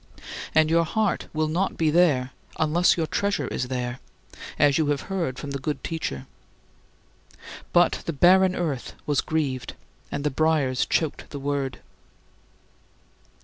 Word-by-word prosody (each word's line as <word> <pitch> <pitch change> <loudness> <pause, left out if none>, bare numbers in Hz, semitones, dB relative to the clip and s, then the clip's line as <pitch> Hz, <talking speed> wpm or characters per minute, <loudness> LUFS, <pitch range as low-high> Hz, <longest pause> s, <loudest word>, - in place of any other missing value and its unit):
And 160 0 +4
your 165 0 +4
heart 215 +4 -1
will 155 0 0
not 175 +5 -1
be 160 -2 +2
there 150 -7 +3 0.3
unless 165 +4 +3
your 165 - +1
treasure 190 -5 -1
is 125 - -2
there, 125 -1 -3 0.6
as 145 0 +4
you 155 - +2
have 145 -2 0
heard 165 -9 -1
from 145 0 -6
the 140 - -3
good 145 +2 -3
Teacher. 155 - -4 1.5
But 175 0 +3
"the - - +1
barren 185 +5 +5
earth" 150 -8 -3
was 145 -1 +1
grieved, 140 -5 -2 0.4
and 140 - -3
the 150 - 0
briers 145 -3 +1
choked 160 -3 -1
the 145 - -6
word. 140 -1 -3
155 Hz, 145 wpm, -25 LUFS, 135-165 Hz, 1.5 s, barren